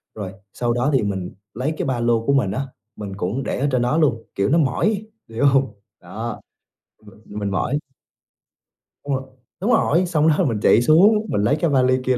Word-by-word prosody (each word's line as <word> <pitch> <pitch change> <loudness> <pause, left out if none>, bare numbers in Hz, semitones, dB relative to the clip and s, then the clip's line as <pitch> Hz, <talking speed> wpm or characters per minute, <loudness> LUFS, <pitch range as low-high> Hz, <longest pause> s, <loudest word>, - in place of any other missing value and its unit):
rồi 100 -3 -5 0.2
sau 120 -1 -1
đó 125 +3 0
thì 130 - +2
mình 95 -3 -3 0.2
lấy 130 +7 -2
cái - - -2
ba 130 -3 -1
lô 120 -1 +1
của 140 - +2
mình 125 -9 +2
á, 135 +4 -3 0.3
mình 100 -2 -7
cũng 105 +9 -2
để - - -3
ở 140 - +1
trên 125 -2 +1
đó 125 +6 +1
luôn. 120 -8 +1
Kiểu 100 +1 +1
nó 160 - +3
mỏi, 200 - +1 0.2
hiểu 115 +5 -1
hông? 135 -1 +3 0.3
Đó, - - -6 0.6
m - - -16 0.3
mình 100 -1 -2
mỏi. 125 +9 -1 1.3
Đúng 140 - -1
rồi, 130 - -4 0.4
đúng 220 - +1
rồi, 175 -2 +3
xong 160 -3 +1
đó 160 +3 +3
mình 115 -7 -1
chạy 115 - +5
xuống, 200 - +5
mình 100 - 0
lấy 140 +8 +2
cái 170 - +1
vali 130 -2 +3
kia 130 -1 +2
130 Hz, 205 wpm, -21 LUFS, 115-150 Hz, 1.3 s, chạy